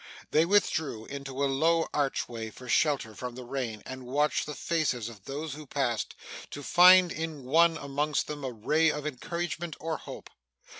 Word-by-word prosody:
They 155 +2 +4
withdrew 160 - +1
into 140 -1 -5
a - - +4
low 160 +5 +2
archway 120 -5 -1
for 125 +4 -12
shelter 135 -5 +2
from 125 +2 -6
the 130 - -7
rain, 120 -4 -4
and 130 -1 -8
watched 145 +4 +1
the 150 - -5
faces 140 -10 -1
of 105 -4 -14
those 145 +2 -4
who 150 0 -9
passed, 130 -5 -1 0.3
to 145 - -7
find 180 +2 +7
in 160 -3 -4
one 165 +5 +4
among 145 +1 -2
them 150 -1 -6
a 130 - -2
ray 155 +9 +2
of 150 -1 -3
encouragement 170 +3 -4
or 160 0 -2
hope. - - -10
145 Hz, 170 wpm, -29 LUFS, 130-160 Hz, 0.3 s, find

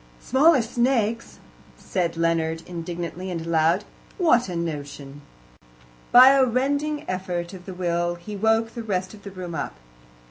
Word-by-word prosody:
"Smaller 270 0 +4
snakes!" 235 -1 0 0.4
said 170 -3 -2
Leonard 165 -1 0
indignantly 175 +1 -6
and 165 -2 -4
aloud. 165 +3 +2 0.3
"What 245 - +3
a 180 - -4
notion!" 145 -3 -5 0.9
By 255 +2 +9
a 275 -1 +5
rending 285 +4 -1
effort 180 -1 -3
of 180 -2 -11
the 190 - -6
will 175 -1 -1
he 190 +5 -8
woke 225 +2 +1
the 235 - -5
rest 185 -3 -3
of 210 - -13
the 200 - -8
room 185 -3 -7
up. 145 - -4
185 Hz, 145 wpm, -24 LUFS, 170-235 Hz, 0.9 s, By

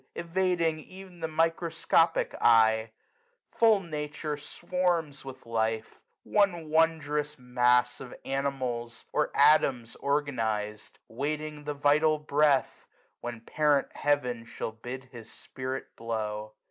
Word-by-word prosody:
Evading 170 -2 0
ev'n 185 -2 -12
the 160 - -2
microscopic 165 +1 +1
eye! 110 -1 +5 0.6
Full 225 -3 +4
Nature 150 -2 -4
swarms 165 -1 -2
with 130 -1 -10
life; 110 -1 -2 0.2
one 175 -7 +1
wondrous 150 -2 +1
mass 125 0 +2
Of 130 -2 -9
animals, 130 -4 -3
or - - +1
atoms 140 -5 +4
organized, 115 -7 -2 0.2
2^0 - - -16
Waiting 150 +1 -3
the 150 0 -3
vital 150 +2 +3
Breath, 150 -2 +1 0.3
when 120 -2 -6
Parent 145 +3 +1
Heaven 125 -5 0
Shall 115 - -5
bid 125 +3 -8
his 115 -3 -11
spirit 130 +1 -6
blow. 110 -2 -4
140 Hz, 110 wpm, -29 LUFS, 120-155 Hz, 0.6 s, eye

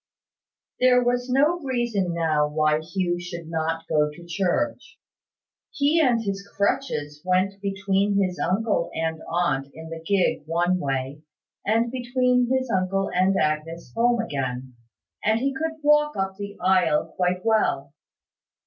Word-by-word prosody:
There 250 -1 +5
was 245 +1 0
no 295 +7 +3
reason 240 - -1
now 155 -3 +2
why 155 0 +2
Hugh 175 +2 -2
should 170 -2 -7
not 165 0 -2
go 150 -1 +2
to 170 +3 -12
church. 195 - -2 0.7
He 295 +4 +2
and 240 -4 +2
his 195 -2 -3
crutches 195 - -2
went 185 +2 0
between 200 0 0
his 185 -2 0
uncle 205 -2 0
and 160 0 -2
aunt 150 -6 0
in 160 0 -9
the 165 0 -7
gig 195 +1 +1
one 175 +3 +1
way, 135 0 -3 0.4
and 230 +3 +1
between 250 -1 +1
his 260 -2 0
uncle 190 0 0
and 185 +2 +3
Agnes 155 +2 -2
home 240 +1 +3
again; 130 - -3 0.5
and 220 +1 +2
he 275 +2 0
could 320 +3 -3
walk 300 -1 +3
up 190 0 -1
the 200 0 -7
aisle 180 -5 +2
quite 180 +1 0
well. 175 -11 +1
190 Hz, 140 wpm, -24 LUFS, 165-235 Hz, 0.7 s, There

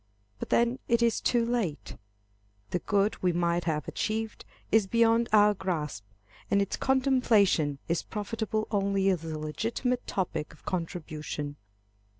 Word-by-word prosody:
But - - -5
then 235 +2 +2
it 235 0 +3
is 230 -1 +2
too 235 -1 +2
late. 230 -11 -2 0.8
The 180 - 0
good 205 +2 0
we 180 - +3
might 170 0 0
have 150 -3 -1
achieved, 220 0 -3 0.3
is 220 -2 +4
beyond 230 +2 +3
our 210 -1 +6
grasp, 160 - -3 0.5
and 200 - +3
its 200 -1 0
contemplation 240 - +3
is 170 0 0
profitable 215 0 -3
only 195 -1 +2
as 180 -4 0
a 160 -1 -4
legitimate 225 - -2
topic 180 -5 -2
of - - -26
contrition. 155 -4 -4
200 Hz, 140 wpm, -29 LUFS, 170-230 Hz, 0.8 s, our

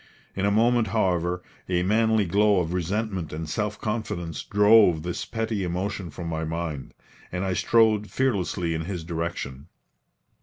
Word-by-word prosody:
In 100 +1 +1
a - - +2
moment, 115 +2 +3
however, 90 -4 0 0.3
a 90 -1 +1
manly 110 +2 +3
glow 100 +2 +3
of 85 -1 -2
resentment 95 0 -2
and 80 +1 -5
self 105 +5 -2
confidence 105 -7 -3
drove 105 -6 +5
this 90 0 -3
petty 110 -3 -2
emotion 90 +1 -3
from 85 +3 -7
my 80 -1 -2
mind, 80 -3 -4 0.4
and 90 +1 -2
I 95 - 0
strode 110 0 +3
fearlessly 95 -9 0
in 80 0 -3
his 90 -3 -4
direction. 80 -4 -4
95 Hz, 150 wpm, -25 LUFS, 85-105 Hz, 0.4 s, drove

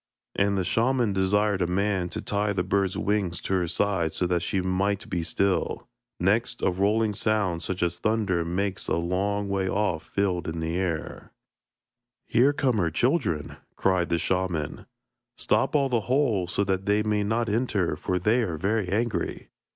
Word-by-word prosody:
And 100 0 +2
the 95 - +1
shaman 115 +3 +1
desired 100 +1 +2
a 90 - +2
man 95 0 0
to - - -5
tie 105 0 0
the 95 - 0
bird's 95 0 0
wings 95 -4 0
to - - -3
her 90 -2 +1
side 85 -3 0
so 90 - 0
that 90 -1 +1
she 95 +3 -1
might 95 +2 0
be 85 - 0
still. 95 +3 -1 0.3
Next 115 +7 +1
a - - +3
rolling 105 +4 +1
sound 105 -5 0
such 90 0 -3
as 85 0 -1
thunder 105 -6 +1
makes 95 +3 -2
a - - +1
long 100 +4 -1
way 95 -1 -1
off 95 -6 -1
filled 90 -4 0
the 80 +1 -2
air. 90 -4 -3 0.9
'Here 125 +5 +4
come 130 -6 +1
her 85 -3 +2
children,' 95 - 0 0.2
cried 90 -2 +1
the 85 - +2
shaman. 90 -4 -2 0.5
'Stop - - +1
all 140 -2 +3
the 120 -3 +1
holes 115 -10 +1
so 100 - +2
that 95 0 -1
they 105 +1 +3
may 105 -1 +1
not 115 +3 0
enter, 105 -7 0
for 90 +3 -2
they 110 +7 +2
are 90 -8 -2
very 100 +3 0
angry.' 110 +3 -2
95 Hz, 175 wpm, -26 LUFS, 90-105 Hz, 0.9 s, Here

